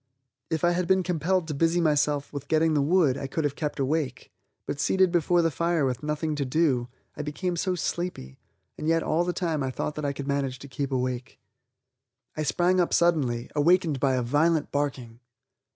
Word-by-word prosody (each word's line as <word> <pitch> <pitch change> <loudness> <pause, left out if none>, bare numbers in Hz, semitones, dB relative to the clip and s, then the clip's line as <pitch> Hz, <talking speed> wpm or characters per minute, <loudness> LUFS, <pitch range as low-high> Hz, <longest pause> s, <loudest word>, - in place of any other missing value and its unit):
If 160 -2 -2
I 175 - +4
had 175 0 -1
been 190 0 +3
compelled 180 0 0
to 155 - -3
busy 165 +4 +2
myself 150 -3 +1
with 145 0 -6
getting 160 +1 +2
the 145 - +2
wood, 150 -3 +3
I 135 - -4
could 160 +4 -2
have 145 -1 -1
kept 150 -2 -3
awake, 135 -1 -2 0.3
but 145 - -4
seated 190 +3 +3
before 175 0 +2
the 165 - +2
fire 170 0 +1
with 130 -1 -2
nothing 150 +1 -2
to 145 - 0
do, 130 -3 +1 0.3
I - - -4
became 175 +5 -3
so 180 +2 -1
sleepy, 170 - -4 0.4
and 155 - -3
yet 165 0 +2
all 165 +3 +1
the 180 - -1
time 165 -4 -2
I 135 - -1
thought 140 +3 -3
that 150 - -6
I 140 - +1
could 140 0 -6
manage 140 -2 -1
to 140 - -11
keep 140 +1 -4
awake. 130 0 -3 1.0
I 155 - -3
sprang 175 +4 +2
up 175 - +2
suddenly, 140 -9 +1
awakened 160 -1 +3
by 135 -1 +2
a 125 - 0
violent 150 +5 +1
barking! 130 -5 -3
150 Hz, 200 wpm, -26 LUFS, 140-170 Hz, 1.0 s, I